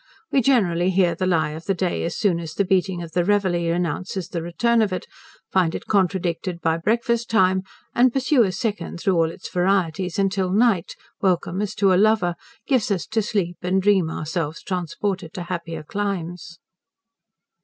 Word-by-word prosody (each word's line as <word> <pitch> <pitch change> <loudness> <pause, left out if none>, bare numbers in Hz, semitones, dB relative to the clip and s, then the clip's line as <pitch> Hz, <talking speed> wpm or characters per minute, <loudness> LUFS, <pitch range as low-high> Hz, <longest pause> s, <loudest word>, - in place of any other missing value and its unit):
We 270 - +4
generally 185 -9 +2
hear 185 -2 +3
the 185 +2 -2
lie 165 -4 +1
of 160 +2 -8
the 195 - 0
day 180 0 -1
as 170 - -3
soon 185 -6 +1
as 160 -1 -7
the 200 - +1
beating 185 -2 +1
of 165 - -9
the 175 +1 +1
Reveille 175 -4 +1
announces 180 +1 -2
the 170 - -3
return 225 +8 +1
of 210 -3 +1
it; 185 - -3 0.5
find 180 -3 +2
it - - -6
contradicted 180 -3 0
by 160 0 +1
breakfast 230 +4 0
time; 190 -4 +3 0.3
and 250 +1 +4
pursue 270 +1 +3
a 195 -5 +3
second 200 -1 -3
through 190 - +1
all 165 -2 +2
its - - -9
varieties, 180 -1 0
until 195 -1 +1
night, 205 -3 +2 0.3
welcome 185 0 +1
as 210 0 -3
to 195 -2 +3
a 185 - +4
lover, 215 -5 +3 0.3
gives 255 -7 +1
us 190 -5 -1
to 225 - +1
sleep 195 -4 -2
and 185 +1 0
dream 195 -5 +3
ourselves 160 0 -3
transported 180 0 -3
to 180 - -4
happier 170 -3 -5
climes. 175 -2 -4
185 Hz, 180 wpm, -23 LUFS, 170-200 Hz, 0.5 s, We